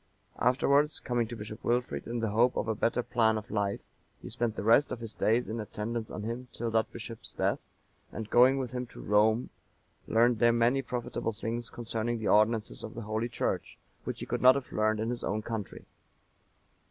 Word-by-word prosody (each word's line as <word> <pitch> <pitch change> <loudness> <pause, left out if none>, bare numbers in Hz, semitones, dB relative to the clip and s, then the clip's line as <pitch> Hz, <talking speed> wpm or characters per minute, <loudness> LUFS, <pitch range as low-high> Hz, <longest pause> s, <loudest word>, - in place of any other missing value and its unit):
(944) - - +4
Afterwards, 140 +3 +2
coming 120 -2 -1
to 120 - -6
Bishop 110 -1 -8
Wilfrid 120 +1 -1
in 120 0 -2
the 110 -2 0
hope 120 +4 +3
of - - -1
a 110 - +1
better 115 +3 0
plan 110 -3 +2
of 110 +2 -7
life, 100 -2 -1 0.4
he - - -9
spent 115 -2 -1
the - - -4
rest 115 +7 +5
of 125 - -3
his 115 -2 -7
days 115 +3 +1
in 115 +1 -4
attendance 110 +1 -4
on 105 - -6
him 120 +3 -4
till 115 0 -3
that 110 0 +1
bishop's 115 -1 -8
death, - - 0 0.5
and 110 0 -6
going 130 +3 +6
with 130 -3 -3
him 125 -1 -4
to - - -13
Rome, 110 +3 +2 0.6
learned 115 0 +3
there 120 +1 +5
many 120 +3 +3
profitable 120 -3 -3
things 115 +2 -4
concerning 115 0 -3
the 110 - -2
ordinances 105 - +2
of - - -7
the 120 - -5
Holy 110 +3 -2
Church, - - -2 0.3
which - - -5
he - - -3
could - - -2
not 130 +1 +8
have 140 -2 -4
learned 110 0 +1
in 110 +2 -1
his 120 - -4
own 110 +1 -1
country. 110 -4 -5
115 Hz, 205 wpm, -30 LUFS, 110-120 Hz, 0.6 s, not